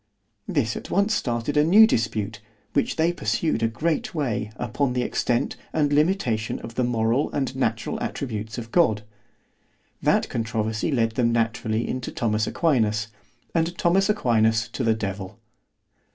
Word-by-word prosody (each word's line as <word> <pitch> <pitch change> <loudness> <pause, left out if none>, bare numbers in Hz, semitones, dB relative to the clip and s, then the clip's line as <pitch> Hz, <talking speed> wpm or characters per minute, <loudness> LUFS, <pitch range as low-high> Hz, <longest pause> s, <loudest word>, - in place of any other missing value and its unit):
This 120 -8 0
at - - -7
once 200 +3 +2
started 120 - -1
a 150 - +5
new 200 +8 +8
dispute, 110 - -1 0.3
which 140 - +1
they 165 +2 +2
pursued 160 -6 -1
a 115 - +3
great 165 - -2
way, 115 -8 -1
upon 125 +2 -1
the 125 -1 0
extent 120 0 0 0.2
and 145 -2 +1
limitation 145 - +1
of 115 - -8
the 125 - 0
moral 120 +3 +1
and 135 -2 -1
natural 115 -3 -1
attributes 110 -4 -4
of 115 -1 -7
God—That 105 - -2
controversy 110 +3 -2
led 115 -4 +2
them 115 +1 +1
naturally 115 -1 0
into 130 -1 -4
Thomas 110 -1 0
Aquinas, 110 -10 +1 0.4
and 165 +1 0
Thomas 190 +4 +2
Aquinas 115 - +2
to 130 - -4
the 115 -1 +3
devil. 95 -3 -5
120 Hz, 145 wpm, -24 LUFS, 110-150 Hz, 0.4 s, new